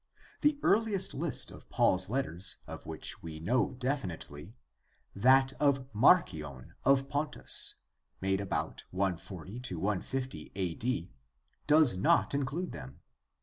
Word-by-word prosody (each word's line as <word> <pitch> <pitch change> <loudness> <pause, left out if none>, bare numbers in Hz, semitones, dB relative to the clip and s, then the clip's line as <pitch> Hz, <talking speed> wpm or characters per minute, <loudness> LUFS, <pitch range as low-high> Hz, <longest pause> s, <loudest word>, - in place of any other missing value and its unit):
The 295 0 +3
earliest 210 -3 +2
list - - -3
of - - -14
Paul's 95 0 +2
letters 110 -8 -1
of - - -9
which 80 -1 -4
we 80 -1 -7
know 120 +10 +1
definitely, 105 - -4 0.6
that 130 +5 +5
of 140 -3 +2
Marcion 85 - +2
of 135 0 +4
Pontus, 145 +2 +1 0.4
made 95 +1 0
about 100 - -3
140 95 +2 -3 0.4
50 130 -12 -5
a.d., 90 - -2 0.5
does 150 -6 +6
not - - +3
include 140 +6 -2
them. 65 +2 -10
120 Hz, 110 wpm, -31 LUFS, 90-140 Hz, 0.6 s, does